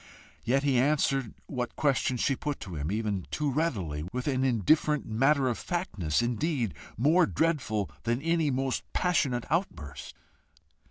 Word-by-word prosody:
Yet 135 Hz, +4 st, +2 dB
he 135 Hz, -4 st, +3 dB
answered 135 Hz, -3 st, +1 dB
what 125 Hz, -3 st, -4 dB
questions 130 Hz, -4 st, +1 dB
she 135 Hz, -, +2 dB
put 145 Hz, +2 st, -3 dB
to 95 Hz, -, -7 dB
him 75 Hz, +3 st, -3 dB
even 105 Hz, -4 st, -2 dB
too 150 Hz, -2 st, -1 dB
readily 105 Hz, -, -1 dB
with 125 Hz, +1 st, -3 dB
an 130 Hz, -2 st, +1 dB
indifferent 135 Hz, -, +2 dB
matter 135 Hz, +5 st, +2 dB
of 120 Hz, -, -1 dB
factness, 120 Hz, -, -1 dB
indeed, 120 Hz, -, -1 dB, 0.2 s
more 160 Hz, -, +4 dB
dreadful 135 Hz, -, 0 dB
than 120 Hz, +1 st, 0 dB
any 165 Hz, 0 st, +1 dB
most 135 Hz, 0 st, 0 dB
passionate 140 Hz, -9 st, +1 dB
outburst. 85 Hz, -, -3 dB
130 Hz, 145 wpm, -29 LUFS, 110-150 Hz, 0.2 s, more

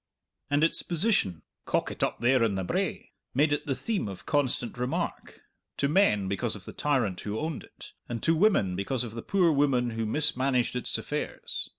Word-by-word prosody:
And 145 Hz, +1 st, +2 dB
its 165 Hz, -, +3 dB
position, 170 Hz, -, +1 dB, 0.2 s
"cockit -, -, -1 dB
up -, -, 0 dB
there 125 Hz, 0 st, +4 dB
on 105 Hz, -4 st, +1 dB
the 95 Hz, -, -1 dB
brae," -, -, -2 dB, 0.2 s
made 145 Hz, +2 st, +4 dB
it 145 Hz, -, -2 dB
the 135 Hz, -, 0 dB
theme 210 Hz, -, -2 dB
of 95 Hz, -2 st, -8 dB
constant 135 Hz, -5 st, 0 dB
remark 125 Hz, +1 st, -3 dB, 0.4 s
to 140 Hz, -, +2 dB
men 140 Hz, -, +3 dB
because 105 Hz, +4 st, -1 dB
of 100 Hz, -2 st, -10 dB
the -, -, -8 dB
tyrant 125 Hz, -11 st, 0 dB
who 105 Hz, +1 st, -3 dB
owned 155 Hz, -2 st, -3 dB
it, -, -, -13 dB, 0.2 s
and 120 Hz, -1 st, -4 dB
to 165 Hz, -, +4 dB
women 155 Hz, -, +3 dB
because 115 Hz, +7 st, -1 dB
of 120 Hz, -, -6 dB
the 115 Hz, -, -5 dB
poor 180 Hz, -, +3 dB
woman 135 Hz, -5 st, +2 dB
who 115 Hz, -1 st, -2 dB
mismanaged 130 Hz, -1 st, +1 dB
its 125 Hz, -, -1 dB
affairs. -, -, -4 dB
125 Hz, 190 wpm, -28 LUFS, 110-150 Hz, 0.4 s, there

